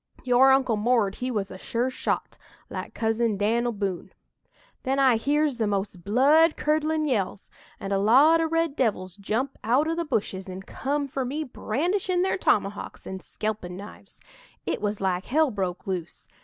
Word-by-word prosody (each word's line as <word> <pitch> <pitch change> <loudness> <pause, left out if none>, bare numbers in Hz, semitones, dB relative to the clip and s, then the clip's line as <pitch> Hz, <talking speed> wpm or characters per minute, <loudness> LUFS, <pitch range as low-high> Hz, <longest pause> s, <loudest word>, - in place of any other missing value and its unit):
Your 255 +1 +5
Uncle 260 -4 +3
'Mord' 215 -3 +1
he 255 - -3
was 205 -5 -2
a 185 - -9
sure 240 +5 -1
shot - - -2 0.4
like - - -6
Cousin 225 -1 0
Dan'l 235 +4 +1
Boone. 200 -4 -4 0.7
"Then 265 +1 -1
I 265 -3 +5
hears 285 +2 +1
the 220 - +1
most 195 -3 -3
blood 290 - +4
curdlin' 310 +1 +1
yells, 205 -6 -2 0.3
and 195 0 -3
a 195 - +2
lot 280 +11 +5
o' 325 - +1
red 330 -2 0
devils 190 - -1
jump 220 +7 -3
out 255 +8 +2
o' 325 - 0
the 340 +1 -1
bushes 195 - -2
an' 185 +1 -7
come 285 +7 -2
for 270 0 -3
me 285 +5 -3
brandishin' 355 - -1
their 380 0 0
tomahawks 200 - -1
an' 190 0 -6
skelpin' 205 -4 -5
knives. 205 +2 -12 0.5
It - - -2
was 205 -1 -2
like 185 -1 0
hell 305 +1 +2
broke 185 -4 -3
loose. 180 -3 -5
235 Hz, 170 wpm, -26 LUFS, 200-285 Hz, 0.7 s, Your